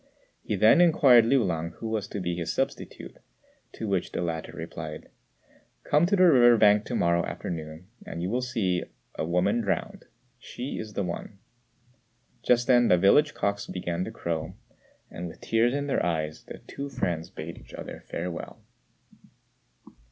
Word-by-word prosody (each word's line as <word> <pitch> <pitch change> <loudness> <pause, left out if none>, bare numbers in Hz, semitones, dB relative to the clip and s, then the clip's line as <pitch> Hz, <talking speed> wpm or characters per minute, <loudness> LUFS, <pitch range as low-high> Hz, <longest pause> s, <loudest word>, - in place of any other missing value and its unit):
He 105 - -2
then 110 - +6
inquired 135 -9 +6
of - - 0
Liu 135 -2 +4
lang 85 -2 -2
who 115 - -7
was 110 -2 -2
to 100 - -5
be 90 -2 -2
his 85 -1 -3
substitute; - - -4 0.5
to 110 - -5
which 95 -3 -1
the - - -2
latter 80 -2 -4
replied, - - -8 0.7
"Come 150 +4 +3
to 200 - +2
the 185 - +4
river 120 -8 +7
bank 105 -1 +5
to - - -4
morrow 85 0 +2
afternoon 80 0 -6 0.2
and - - -7
you'll 115 +8 -1
see 105 -8 -1 0.3
a - - -3
woman 90 - +1
drowned: 200 -3 -3 0.3
she 125 +2 -6
is 110 -1 -7
the 100 - -1
one." 90 +3 -6 1.0
Just 120 0 +3
then 120 -2 +5
the 90 - +5
village 145 - +4
cocks 100 0 -2
began 90 -1 -3
to - - -5
crow, 85 +2 -4 0.6
and, 85 +1 -6
with 80 - -11
tears 115 +3 +1
in 145 0 -1
their 140 - 0
eyes, 80 -3 -2
the - - -9
two 140 0 -7
friends 85 -10 -2
bade 80 +2 -8
each - - -13
other - - -8
farewell. 85 0 -5
100 Hz, 165 wpm, -27 LUFS, 85-125 Hz, 1.0 s, river